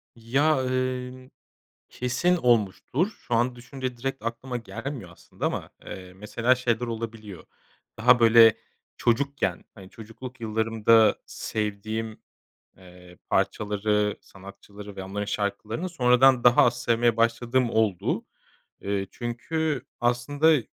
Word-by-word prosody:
Ya, 135 +5 +1
emm, 130 0 -3 0.6
kesin 125 +9 0
olmuştur. 120 - +1
Şu 120 - -6
an 120 +2 +1
düşününce 125 +1 -6
direkt 135 +1 -4
aklıma 125 +2 -4
gelmiyor 115 - -7
aslında 85 - -6
ama, - - -3 0.2
eee, 90 -1 -9
mesela 115 +5 +1
şeyler 125 -2 -1
olabiliyor. 110 -4 -7 0.5
Daha 125 +2 +5
böyle 115 -1 +7 0.4
çocukken, 140 +4 0
hani, 95 -3 -13
çocukluk 125 +2 -11
yıllarımda 110 0 +3
sevdiğim, 110 +1 -4 0.6
eee, 90 -1 -16
parçaları, 105 0 0
sanatçıları 100 +1 -12
ve 95 - -6
onların 100 +2 -4
şarkılarını 105 - -3
sonradan 125 -4 +4
daha 120 0 +6
az 120 0 0
sevmeye 115 -1 +2
başladığım 120 +2 +1
oldu. 110 -5 0 0.6
Eee, 100 -1 -2
çünkü 140 +4 -3 0.2
aslında 140 +4 +2
115 Hz, 110 wpm, -26 LUFS, 105-125 Hz, 0.6 s, böyle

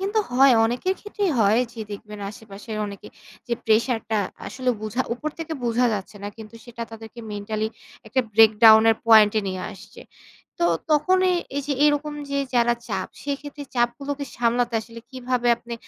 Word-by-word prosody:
কিন্তু 405 +3 0
হয় 260 0 +6
অনেকের 245 +12 0
ক্ষেত্রেই 415 -3 -2
হয়। 215 +2 +4
যে 230 - -9
দেখবেন 210 0 -9
আশেপাশের 215 +1 -9
অনেকে 200 -1 -9 0.4
যে 240 - 0
pressure 225 +2 +2
টা 215 - +2 0.3
আসলে 255 -1 -1
বোঝা 215 +4 -1
উপর 300 +5 -4
থেকে 325 0 -5
বোঝা 240 +1 +2
যাচ্ছে 205 +1 -6
না 205 - -4
কিন্তু 220 0 -11
সেটা 235 -1 -8
তাদেরকে 225 +1 -10
mentally 215 +1 -3 0.4
একটা 255 +4 +1
breakdown 220 0 +7
এর 225 - +2
point 215 -2 +7
এ - - +2
নিয়ে 185 -1 -4
আসছে। 190 - -14 0.6
তো - - +1 0.3
তখনই 370 +5 +3 0.2
এই 285 - -1
যে 295 - 0
এইরকম 295 0 +1 0.2
যে 280 - 0 0.2
যারা 240 0 +3
চাপ 190 -3 -3
সেক্ষেত্রে 285 +1 -5
চাপগুলোকে 275 +4 -1
সামলাতে 240 0 +1
আসলে 230 +1 -11
কিভাবে 250 -1 -1
আপনি 235 0 -8
235 Hz, 165 wpm, -23 LUFS, 220-275 Hz, 0.6 s, breakdown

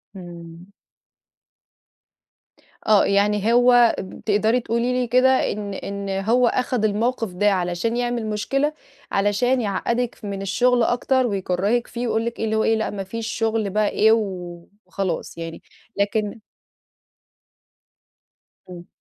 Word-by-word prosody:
آمم. 175 0 -11 2.2
آه 210 -2 +5
يعني 205 +2 +2
هو 245 -1 +5 0.3
ت - - -41
تقدري 220 +4 +2
تقولي 235 +1 -1
لي 250 -1 0
كده 255 +2 +3
إن 205 -1 -5
إن 200 +1 -5
هو 220 +6 +2
اخد 245 -2 0
الموقف 225 0 -1
ده 205 +3 +2
علشان 180 +5 -1
يعمل 240 -2 -1
مشكلة، 275 +8 -1 0.4
علشان 240 +6 +1
يعقدِك 235 +4 -2
من 200 -1 -4
الشغل 245 +5 +2
أكتر 255 +2 +1
ويكرهِك 200 +3 -1
فيه 240 0 -4
ويقول 225 0 0
لك 235 0 -5
إيه - - -1
اللي 220 0 -1
هو 220 - +2
إيه 225 - +3
لأ 220 0 -1
مفيش 205 +3 -5
شغل 225 -2 -1
بقى 210 +1 +1
إيه 220 +1 +3
و 180 -6 -2 0.2
وخلاص 180 -3 -4
يعني 165 0 -7 0.4
لكن 210 +2 -1 2.3
امم. 175 -1 -11
215 Hz, 130 wpm, -22 LUFS, 195-240 Hz, 2.3 s, آه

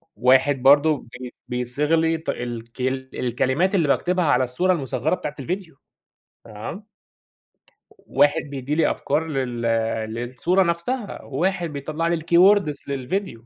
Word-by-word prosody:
واحد 130 +2 +3
برضه 145 +3 +5 0.2
بي 125 -1 -8
بيصيغ 125 +5 0
لي 165 0 +2
ت 160 - -8
الك 120 0 -5 0.3
الكلمات 130 - 0
اللي 170 -6 +2
باكتبها 180 +5 +1
على 145 -3 +3
الصورة 130 +10 0
المصغرة 155 +1 -1
بتاعة 150 -4 -6
الڤيديو، 175 +3 -4 0.7
تمام. 115 - -8 1.0
واحد 145 +3 +1
بيدي 140 0 -4
لي 160 -1 +3
أفكار 155 +3 -1
لل 130 -5 -3 0.5
للصورة 130 +11 0
نفسها، 185 +7 -3
وواحد 175 +4 -1
بيطلع 155 +4 -3
لي 170 0 +1
الkeywords 175 -1 +3
للفيديو، 140 - -3
150 Hz, 125 wpm, -23 LUFS, 130-170 Hz, 1.0 s, برضه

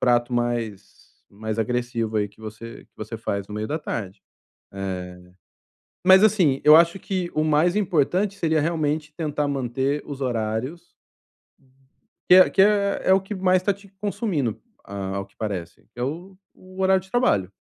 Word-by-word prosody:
prato 120 0 +2
mais 120 -4 -4
mais 110 +1 -5
agressivo 115 -1 -1
aí 105 -1 -1
que 100 +2 -23
você, 110 +2 -9
que - - -52
você 110 +2 -6
faz 100 -3 -3
no 105 - -7
meio 105 +1 -3
da 155 - -2
tarde. 100 - -5 0.5
Eh, 90 -2 -5 0.8
mas 190 +2 +7
assim, 180 -11 +3
eu 150 +1 +9
acho 170 +3 +3
que 185 -3 -3
o 155 - +2
mais 155 +4 +2
importante 190 +1 +1
seria 160 -4 +1
realmente 155 -1 -1
tentar 150 -3 -2
manter 135 +1 -1
os 140 -1 -7
horários 120 +5 -2 1.5
que - - +8
é 185 - +8
que 190 - +3
é 200 -2 +3
o 190 - +3
que 195 +2 -6
mais 185 -1 +2
tá 200 - +1
te 200 +1 -17
consumindo, 190 - -2 0.2
ao 95 -1 -5
que 100 - -32
parece, 90 -6 -5
que 120 - -12
é - - -1
o 170 +8 -5 0.2
o 185 +1 -10
horário 190 0 +3
de 190 +1 -19
trabalho, 100 - +1
140 Hz, 165 wpm, -23 LUFS, 110-185 Hz, 1.5 s, eu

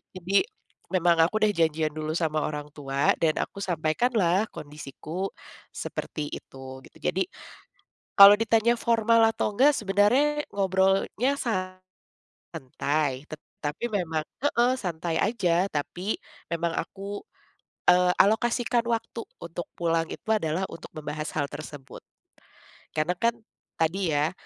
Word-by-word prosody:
Jadi, 185 - +2 0.5
memang 170 -3 +4
aku 215 +6 +1
udah 215 -1 +3
janjian 160 -2 +1
dulu 155 0 -3
sama 155 -2 0
orang 150 -1 -4
tua 140 0 +1
dan 155 -2 +1
aku 200 - -4
sampaikanlah 180 +3 +1
kondisiku 155 +5 -6 0.4
seperti 150 -2 -5
itu, 130 0 -10
gitu. - - -17
Jadi, 180 +2 0 1.0
kalau 200 +1 +12
ditanya 225 +1 +2
formal 230 -1 +3
atau 210 -2 -2
enggak, 280 +5 +6
sebenarnya 240 +10 +3
ngobrolnya 195 +7 +1 0.9
santai. 145 -1 -3
Tetapi 150 +4 -7
memang 165 -6 -1 0.2
heeh, 240 -2 +3
santai 165 -4 -2
aja. 185 -5 +2
Tapi 180 +5 -3 0.3
memang 170 0 -1
aku, 200 +1 -5 0.7
eee, 180 0 +5
alokasikan 235 +3 +2
waktu 230 0 -3 0.2
untuk 170 +1 -6
pulang 165 -1 0
itu - - -10
adalah 190 -3 0
untuk 165 - -10
membahas 150 0 -5
hal 145 -2 -1
tersebut. 145 -4 -9 0.9
Karena 155 +3 +1
kan 235 0 +2 0.4
tadi 165 0 0
ya, 150 +3 +2
175 Hz, 120 wpm, -26 LUFS, 155-210 Hz, 1.0 s, kalau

